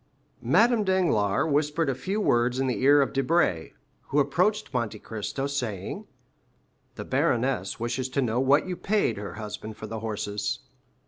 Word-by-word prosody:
Madame 235 -2 +4
Danglars 165 - +2
whispered 150 +2 +1
a 135 - +1
few 190 +12 -3
words 125 - +2
in 135 - +1
the 125 -1 -1
ear 140 +2 +6
of - - -4
Debray, 135 - +1 0.3
who 140 - -2
approached 175 +8 +1
Monte 115 -3 -1
Cristo, 110 +5 -4
saying, 120 -9 -4 0.9
"The - - -6
baroness 120 -6 0
wishes 120 +3 -2
to 140 +2 0
know 120 0 0
what 135 +3 +4
you 185 -1 -3
paid 195 - 0
her 100 0 -6
husband 110 0 -7
for - - -7
the 115 - -5
horses." 105 -2 -3
130 Hz, 155 wpm, -26 LUFS, 110-150 Hz, 0.9 s, ear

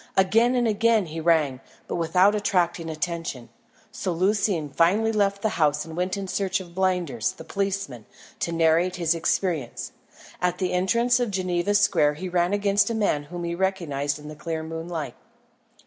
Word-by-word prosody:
Again 225 +6 +4
and 240 -1 +2
again 220 -1 +2
he 160 0 -6
rang, 155 -6 +2 0.3
but - - -4
without 180 +4 +3
attracting 175 -5 0
attention; 160 -6 -4 0.4
so 190 - -3
Lucian 185 -2 +1
finally 190 +10 +2
left 200 -1 0
the 220 - +2
house 150 0 +2
and 160 -1 -9
went 180 +3 -1
in 195 -1 -4
search 190 0 -1
of 175 -2 -11
Blinders, 180 - 0
the - - -11
policeman, 195 - -3 0.3
to 170 - -2
narrate 165 +2 +2
his 170 -2 +1
experience. 165 -5 -1 0.5
At 180 -1 +1
the 185 -2 -1
entrance 235 +7 +2
of 245 -2 0
Geneva 185 0 0
Square 150 -7 +3
he 185 +4 -5
ran 175 0 +1
against 205 +1 +2
a 230 - -1
man 175 -9 0
whom 175 +3 -7
he 170 0 -2
recognised 165 -7 -1
in 150 0 -11
the 155 - -8
clear 160 +1 -4
moonlight. 165 -1 -5
180 Hz, 170 wpm, -25 LUFS, 160-200 Hz, 0.5 s, Again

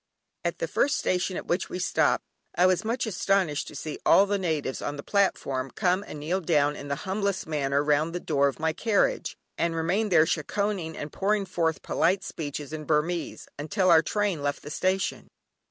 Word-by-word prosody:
At - - -1
the - - -2
first 285 - +1
station 185 0 0
at - - -5
which 175 +2 -1
we - - -4
stopped, 180 - +1 0.3
I 180 - +4
was 185 +2 +3
much 230 +4 -1
astonished 190 -6 0
to - - -9
see 150 +2 -5
all 195 - +6
the 205 0 0
natives 155 -7 -2
on 145 - -3
the 140 - -7
platform 135 -10 0
come 185 +7 +1
and 150 - -7
kneel 175 +6 -1
down 150 -3 +2
in 145 - -8
the 140 - -1
humblest 200 0 -1
manner 140 -2 0
round 150 +2 +2
the - - -1
door 140 -4 +2
of 140 - -3
my 160 0 0
carriage, 225 - 0 0.2
and 170 0 +1
remain 185 +7 0
there 160 -4 +5
"shekkohing" 180 +1 -1
and 145 - -6
pouring 205 +1 +1
forth 165 -4 -1
polite 190 +1 +1
speeches 150 -2 -5
in 155 -1 -5
Burmese, 160 +3 -1
until 175 +5 +2
our 160 -1 +7
train 200 -1 -1
left 145 0 -2
the 150 - -7
station. 190 +4 -1
170 Hz, 195 wpm, -27 LUFS, 150-195 Hz, 0.3 s, our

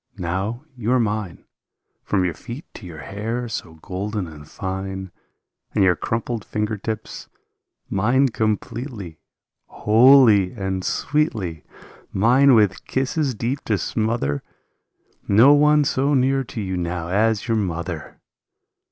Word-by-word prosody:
Now 95 - -3
you 120 -1 -2
are 130 - +4
mine 105 -5 -2 0.6
From 95 -1 0
your 85 - -1
feet 120 - -9
to 95 - -10
your 80 -3 -9
hair 115 +7 -4
so 85 -7 -6
golden 100 +2 -3
and 75 -3 -12
fine, 95 -1 -5 0.6
And 100 - +4
your 90 -2 +4
crumpled 115 +3 -3
finger 105 0 -2
tips... 110 +1 -6 0.6
mine 120 +8 +2
com 110 -2 +1
pletely, 110 - -8 0.5
Wholly 110 -4 +5
and 95 -3 -3
sweetly; 110 - -1 0.5
Mine 125 +6 +5
with 105 -4 +2
kisses 135 0 -1
deep 120 +6 -3
to 105 - +1
smother. 110 -7 -1 0.9
No 115 +8 +7
one 150 +1 +5
so 140 +1 +1
near 135 +1 +2
to 115 - -7
you 95 -2 -3
now 85 -1 -3
as 110 +4 +1
your 115 -1 +1
mother 85 -5 -4
105 Hz, 130 wpm, -22 LUFS, 95-125 Hz, 0.9 s, No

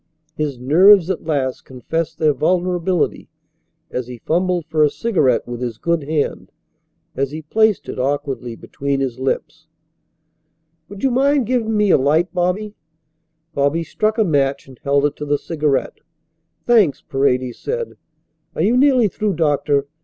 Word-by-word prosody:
His 150 -4 -3
nerves 175 +8 +5
at 180 - -5
last 140 -5 -1
confessed 150 +6 -4
their 155 -2 +3
vulnerability 180 +2 0 0.6
as 125 -1 -3
he 125 -1 -8
fumbled 175 +5 0
for 155 -1 +1
a 150 - +4
cigarette 150 - +1
with 120 0 -6
his 120 -3 -3
good 170 +1 -1
hand, 150 -1 -2 0.6
as 140 0 -1
he 155 +2 -7
placed 220 +6 +1
it - - -6
awkwardly 135 -3 -2
between 140 +3 -3
his 130 -2 -3
lips. 155 +4 -3 1.2
"Would 200 0 -10
you 265 - +3
mind 275 +1 +2
giving 225 -2 0
me 210 -2 +3
a - - +5
light, 155 +7 +1
Bobby?" 180 +4 -1 0.8
Bobby 145 +4 +1
struck 215 +7 -1
a 220 - +4
match 140 -6 0
and 130 -2 -15
held 140 +1 +2
it 145 - 0
to 150 - -5
the 145 0 +2
cigarette. 150 -3 -1 0.7
"Thanks," 205 - +3
Paredes 130 -2 0
said. 475 0 -4 0.6
"Are - - 0
you 230 +4 +3
nearly 255 -3 +4
through, 205 -1 -2
doctor? 145 -3 +1
155 Hz, 155 wpm, -19 LUFS, 140-195 Hz, 1.2 s, nerves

